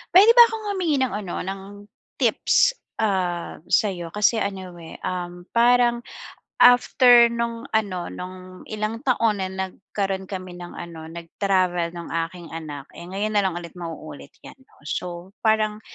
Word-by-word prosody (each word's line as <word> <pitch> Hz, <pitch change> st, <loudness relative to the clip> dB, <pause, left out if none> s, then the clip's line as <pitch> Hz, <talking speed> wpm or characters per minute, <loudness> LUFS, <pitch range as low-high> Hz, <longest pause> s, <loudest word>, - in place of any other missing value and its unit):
Puwede 405 Hz, +5 st, +9 dB
ba'kong 465 Hz, -2 st, +6 dB
humingi 350 Hz, -6 st, 0 dB
ng 260 Hz, -, -1 dB
ano 200 Hz, -4 st, -4 dB
ng, 195 Hz, +1 st, -5 dB, 0.6 s
tips, -, -, +3 dB, 0.2 s
ah, 185 Hz, -7 st, -1 dB
sa'yo 180 Hz, -5 st, +1 dB
kasi 210 Hz, +4 st, +2 dB
ano, 190 Hz, -2 st, -4 dB
eh, 160 Hz, -, -10 dB
um, 175 Hz, -1 st, -4 dB
parang 240 Hz, 0 st, +4 dB, 0.6 s
after 245 Hz, -1 st, +7 dB
no'ng 235 Hz, 0 st, -3 dB
ano, 195 Hz, -5 st, 0 dB
no'ng 185 Hz, 0 st, -9 dB
ilang 215 Hz, +1 st, -3 dB
taon 230 Hz, -6 st, +1 dB
na 185 Hz, -, -2 dB
nagkaro'n 190 Hz, 0 st, -4 dB
kami 185 Hz, -2 st, -6 dB
ng 175 Hz, -, -9 dB
ano, 160 Hz, -2 st, -8 dB
nag-travel 175 Hz, +1 st, 0 dB
ng 170 Hz, 0 st, -8 dB, 0.2 s
aking 170 Hz, -2 st, -12 dB
anak, 150 Hz, -3 st, -7 dB
eh, -, -, -10 dB
ngayon 200 Hz, +3 st, -2 dB
nalang 190 Hz, -4 st, +1 dB
ulit 170 Hz, -1 st, -9 dB
mauulit 160 Hz, -4 st, -8 dB, 0.2 s
'yan -, -, -11 dB
'no. -, -, -25 dB
So 175 Hz, +3 st, -5 dB
parang 215 Hz, -1 st, +2 dB
190 Hz, 145 wpm, -23 LUFS, 175-225 Hz, 0.6 s, Puwede